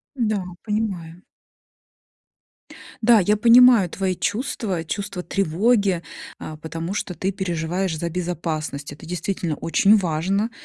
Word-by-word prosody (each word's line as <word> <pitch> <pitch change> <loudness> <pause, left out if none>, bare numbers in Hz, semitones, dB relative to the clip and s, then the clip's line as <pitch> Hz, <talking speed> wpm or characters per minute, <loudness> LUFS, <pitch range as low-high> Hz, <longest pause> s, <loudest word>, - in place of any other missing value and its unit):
Да, 215 -6 0 0.2
понимаю. 190 -6 -3 1.8
Да, 230 0 +6
я 210 +3 +2
понимаю 235 -4 +6
твои 190 -1 -1
чувства, 190 - -2
чувство 200 +1 -4
тревоги, 195 0 +1 0.4
а, 155 - -7
потому 165 +4 -5
что 180 -3 -3
ты 190 +5 -2
переживаешь 175 -2 -2
за 170 +2 -2
безопасность. 160 -4 -4
Это 145 - -12
действительно 175 -2 -3
очень 200 +5 +4
важно 190 +4 0
185 Hz, 115 wpm, -22 LUFS, 165-205 Hz, 1.8 s, Да